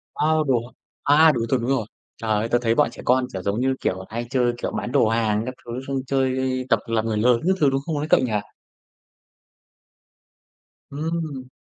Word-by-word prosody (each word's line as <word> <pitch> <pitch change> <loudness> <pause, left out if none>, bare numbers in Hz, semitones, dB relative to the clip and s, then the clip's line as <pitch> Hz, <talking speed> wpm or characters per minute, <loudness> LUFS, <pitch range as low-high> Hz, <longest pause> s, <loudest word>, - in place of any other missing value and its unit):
A, 150 - +1 0.2
đồ 120 -3 +1
hả? 125 - -14 0.5
A, 160 0 +7
đồ 120 - -2
thường 130 -1 +1
đúng 120 - -2
rồi. 130 -5 +1 0.3
Trời 115 - -5
ơi, 110 +2 +1
tớ 120 - +3
thấy 115 -1 +1
bọn - - +3
trẻ - - -10
con, 125 +1 +3
kiểu, 95 - -4
giống 100 +4 -1
như, 130 +1 +1
kiểu, 95 - -1
à, 95 - -9
hay 115 +2 -4
chơi, 125 -2 +1
kiểu, - - -3
bán 120 - -4
đồ 130 -4 +3
hàng 110 -1 +1
các 130 - -4
thứ 120 - -7 0.2
xong 135 -1 -1
chơi 130 -1 +1 0.3
tập - - +4
làm 115 -1 0
người 110 -2 -1
lớn 120 +2 +3
các 190 - +4
thứ, 145 - +4
đúng 135 0 -1
không 160 -3 -2
ấy 145 +1 -2
cậu - - +6
nhỉ? 125 -4 -1 2.6
Ừm. 150 -2 -4
125 Hz, 215 wpm, -23 LUFS, 115-135 Hz, 2.6 s, A